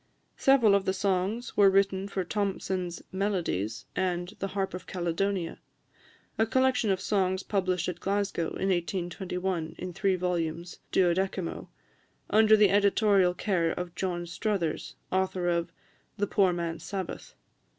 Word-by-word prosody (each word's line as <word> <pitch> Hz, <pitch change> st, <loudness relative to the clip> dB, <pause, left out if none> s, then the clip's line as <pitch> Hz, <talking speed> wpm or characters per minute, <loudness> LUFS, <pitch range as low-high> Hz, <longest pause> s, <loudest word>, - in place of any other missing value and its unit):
Several 255 Hz, -7 st, +5 dB
of 200 Hz, -1 st, +2 dB
the 190 Hz, +1 st, 0 dB
songs 195 Hz, +4 st, -1 dB
were 200 Hz, -1 st, +7 dB
written 195 Hz, 0 st, +2 dB
for 195 Hz, -1 st, -2 dB
Thomson's 185 Hz, -2 st, -2 dB
"Melodies," 180 Hz, -, -1 dB
and 180 Hz, -1 st, -1 dB
"The 195 Hz, -, -1 dB
Harp 195 Hz, 0 st, -2 dB
of 180 Hz, -, -7 dB
Caledonia," 180 Hz, 0 st, -2 dB, 0.8 s
a 220 Hz, -, +3 dB
collection 260 Hz, -2 st, +2 dB
of 190 Hz, -1 st, +2 dB
songs 190 Hz, -2 st, 0 dB
published 185 Hz, -4 st, 0 dB
at 180 Hz, -1 st, -4 dB
Glasgow 195 Hz, -4 st, -1 dB
in 195 Hz, -, -2 dB
1821, 180 Hz, -1 st, -2 dB
in 180 Hz, 0 st, -6 dB
three 195 Hz, +1 st, +1 dB
vols. 175 Hz, -1 st, -2 dB
12mo, 185 Hz, 0 st, 0 dB, 0.6 s
under 215 Hz, 0 st, +6 dB
the 205 Hz, -3 st, +5 dB
editorial 200 Hz, -2 st, +4 dB
care 175 Hz, -4 st, +1 dB
of 175 Hz, 0 st, -4 dB
John 175 Hz, -1 st, -2 dB
Struthers, 175 Hz, -2 st, -2 dB, 0.2 s
author 185 Hz, -1 st, 0 dB
of 170 Hz, -1 st, 0 dB, 0.5 s
"The 205 Hz, -, +1 dB
Poor 195 Hz, -2 st, +3 dB
Man's 170 Hz, -1 st, -3 dB
Sabbath." 190 Hz, -3 st, -6 dB
190 Hz, 135 wpm, -28 LUFS, 175-200 Hz, 0.8 s, were